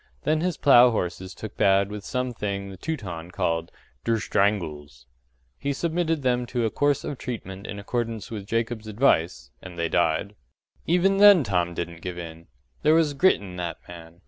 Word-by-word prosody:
Then 155 Hz, +1 st, +1 dB
his 180 Hz, 0 st, -1 dB
plough 125 Hz, -3 st, +7 dB
horses 95 Hz, -3 st, -3 dB
took 110 Hz, -, -8 dB
bad 100 Hz, -1 st, +3 dB
with 105 Hz, -1 st, -6 dB
some 125 Hz, +1 st, -2 dB
thing 100 Hz, -3 st, -4 dB
the -, -, -9 dB
Teuton 90 Hz, -, -5 dB
called 85 Hz, -3 st, -2 dB, 0.3 s
“der 115 Hz, -, +1 dB
shtranguls.” 80 Hz, -, -1 dB, 0.5 s
He 140 Hz, 0 st, -1 dB
submitted 165 Hz, 0 st, -1 dB
them 125 Hz, -1 st, +1 dB
to 120 Hz, -1 st, -1 dB
a 110 Hz, -, 0 dB
course 145 Hz, -1 st, +1 dB
of 145 Hz, -3 st, -5 dB
treatment 100 Hz, -5 st, -6 dB
in 100 Hz, -, -6 dB
accordance 115 Hz, +1 st, -3 dB
with 100 Hz, -3 st, -6 dB
Jacob's 115 Hz, 0 st, -2 dB
advice 90 Hz, -, +1 dB
and 90 Hz, -2 st, -10 dB
they 85 Hz, -1 st, -1 dB
died. 85 Hz, +5 st, +1 dB, 0.5 s
Even 180 Hz, +3 st, +3 dB
then 200 Hz, -5 st, +8 dB
Tom 90 Hz, -5 st, -1 dB
didn't 85 Hz, -1 st, -5 dB
give 90 Hz, 0 st, -5 dB
in 85 Hz, -1 st, -9 dB, 0.3 s
there 155 Hz, +1 st, +4 dB
was 160 Hz, -3 st, +3 dB
grit 185 Hz, +7 st, +4 dB
in 95 Hz, -3 st, -9 dB
that 85 Hz, -2 st, -4 dB
man. 85 Hz, -1 st, -12 dB
105 Hz, 175 wpm, -25 LUFS, 85-130 Hz, 0.5 s, then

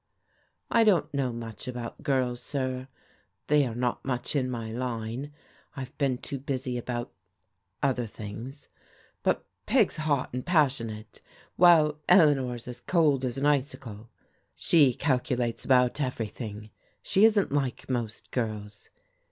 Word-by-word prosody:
" -, -, -39 dB
I 230 Hz, -, +5 dB
don't 195 Hz, -10 st, +3 dB
know 135 Hz, -3 st, 0 dB
much 115 Hz, -2 st, -7 dB
about 120 Hz, -2 st, -6 dB
girls, 130 Hz, -4 st, 0 dB
sir, 130 Hz, -2 st, -3 dB, 0.6 s
they 145 Hz, -2 st, +3 dB
are 115 Hz, -, -5 dB
not 125 Hz, 0 st, -1 dB
much 130 Hz, +2 st, -2 dB
in 130 Hz, -3 st, +1 dB
my 115 Hz, -3 st, -4 dB
line; 120 Hz, +3 st, -4 dB, 0.4 s
I've 135 Hz, +1 st, -7 dB
been 135 Hz, -3 st, +1 dB
too 140 Hz, +2 st, -6 dB
busy 130 Hz, -1 st, -3 dB
about 120 Hz, 0 st, -4 dB, 0.4 s
— -, -, -24 dB
other 125 Hz, -4 st, +1 dB
things. 115 Hz, +6 st, -8 dB, 0.5 s
But -, -, 0 dB, 0.2 s
Peg's 225 Hz, -10 st, +3 dB
hot 145 Hz, -5 st, 0 dB
and 125 Hz, 0 st, -3 dB
passionate, 120 Hz, -10 st, 0 dB, 0.3 s
while 155 Hz, -4 st, +6 dB
Eleanor's 135 Hz, -10 st, +4 dB
as 125 Hz, -, -7 dB
cold 150 Hz, -7 st, +2 dB
as 125 Hz, -1 st, -2 dB
an 135 Hz, -, 0 dB
icicle. 130 Hz, -6 st, -1 dB, 0.5 s
She 140 Hz, -7 st, +4 dB
calculates 125 Hz, -4 st, -1 dB
about 125 Hz, +2 st, +3 dB
everything. 110 Hz, -4 st, -4 dB, 0.3 s
She 195 Hz, -, +3 dB
isn't 215 Hz, -6 st, +4 dB
like 135 Hz, -4 st, -1 dB
most 120 Hz, -4 st, -4 dB
girls. 105 Hz, -4 st, -4 dB
130 Hz, 135 wpm, -28 LUFS, 120-145 Hz, 0.6 s, while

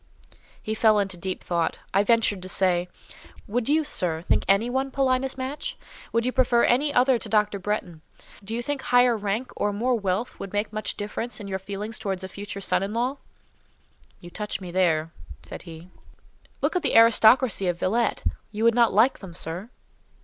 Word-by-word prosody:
He 215 Hz, -, -2 dB
fell 215 Hz, -1 st, +4 dB
into 195 Hz, -2 st, 0 dB
deep 185 Hz, +2 st, -5 dB
thought. 170 Hz, -2 st, -1 dB, 0.2 s
I 200 Hz, +1 st, +4 dB
ventured 215 Hz, -3 st, +2 dB
to 185 Hz, -, -7 dB
say, 180 Hz, -1 st, +1 dB, 0.6 s
"Would 235 Hz, +4 st, -1 dB
you, 310 Hz, +2 st, +3 dB
sir, 170 Hz, -, -1 dB
think -, -, +1 dB
any 200 Hz, +4 st, +3 dB
one 265 Hz, +2 st, -1 dB
Paulina's 265 Hz, -1 st, 0 dB
match? 285 Hz, -, -5 dB, 0.3 s
Would 230 Hz, +1 st, +1 dB
you 255 Hz, -, +1 dB
prefer 245 Hz, -2 st, +3 dB
any 285 Hz, +5 st, +3 dB
other 255 Hz, -2 st, +3 dB
to 220 Hz, -, -9 dB
Dr. 210 Hz, -1 st, +1 dB
Bretton? 180 Hz, -5 st, -3 dB, 0.4 s
Do 220 Hz, +3 st, -5 dB
you 240 Hz, -, -3 dB
think 290 Hz, +1 st, -3 dB
higher 245 Hz, -1 st, +4 dB
rank 215 Hz, +4 st, -3 dB
or 205 Hz, -, 0 dB
more 235 Hz, +5 st, 0 dB
wealth 205 Hz, +1 st, -2 dB
would 195 Hz, -, -7 dB
make 205 Hz, +1 st, -2 dB
much 215 Hz, 0 st, -3 dB
difference 210 Hz, +4 st, -4 dB
in 205 Hz, -, -7 dB
your 190 Hz, -1 st, -3 dB
feelings 205 Hz, +3 st, -5 dB
towards 195 Hz, -3 st, -3 dB
a -, -, -4 dB
future 200 Hz, +1 st, -7 dB
son -, -, +1 dB
in 200 Hz, +3 st, -3 dB
law?" 250 Hz, +4 st, -1 dB, 1.0 s
"You 175 Hz, -, -12 dB
touch 210 Hz, +2 st, -4 dB
me 180 Hz, -3 st, -8 dB
there," 165 Hz, -3 st, +1 dB, 0.3 s
said -, -, -8 dB
he. 165 Hz, +2 st, -11 dB, 0.7 s
"Look -, -, +1 dB
at 360 Hz, -, +2 dB
the -, -, -1 dB
aristocracy 225 Hz, -2 st, +5 dB
of 175 Hz, -1 st, 0 dB
Villette—you 220 Hz, 0 st, -1 dB
would 230 Hz, 0 st, +5 dB
not 235 Hz, -1 st, +4 dB
like 225 Hz, +7 st, +4 dB
them, 180 Hz, -4 st, -10 dB
sir?" 175 Hz, +5 st, -5 dB
215 Hz, 185 wpm, -25 LUFS, 190-245 Hz, 1.0 s, aristocracy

